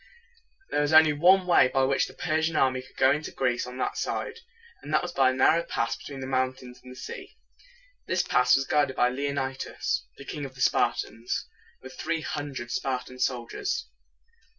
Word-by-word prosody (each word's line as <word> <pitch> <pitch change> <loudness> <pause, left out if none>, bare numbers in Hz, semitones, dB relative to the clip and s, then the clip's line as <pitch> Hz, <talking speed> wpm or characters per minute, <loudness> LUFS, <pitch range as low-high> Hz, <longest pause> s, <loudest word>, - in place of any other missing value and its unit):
There 145 - +1
was 145 +1 0
only 155 -1 +7
one 180 +5 +5
way 175 -7 +5
by 135 +1 +1
which 135 +1 +2
the - - -13
Per 155 +1 0
sian 160 0 0
army 130 -3 +2
could 130 - -19
go 130 - +5
into 150 +2 -1
Greece 125 -2 -1
on 125 0 -8
that - - -2
side, - - -3 0.4
and - - -8
that - - +2
was - - -4
by 135 -1 +4
a - - 0
narrow 160 +5 +4
pass 115 -8 -2
between 140 -2 -9
the - - -4
mountains 130 -1 -2
and 125 - -12
the - - -11
sea. 390 - -9 0.7
This - - +1
pass 125 -1 +4
was 135 - 0
guarded 145 -3 +1
by 125 - +3
Le 140 +3 -2
on´i 135 -1 -2
das, 480 +1 -3
the 140 - -11
King 150 0 -5
of 135 -2 -7
the 125 - -9
Spartans, 115 -1 0 0.4
with 130 0 -10
three 165 -1 -1
hundred 140 -6 -5
Spartan 130 0 -3
soldiers. 125 - -2
135 Hz, 200 wpm, -27 LUFS, 130-150 Hz, 0.7 s, only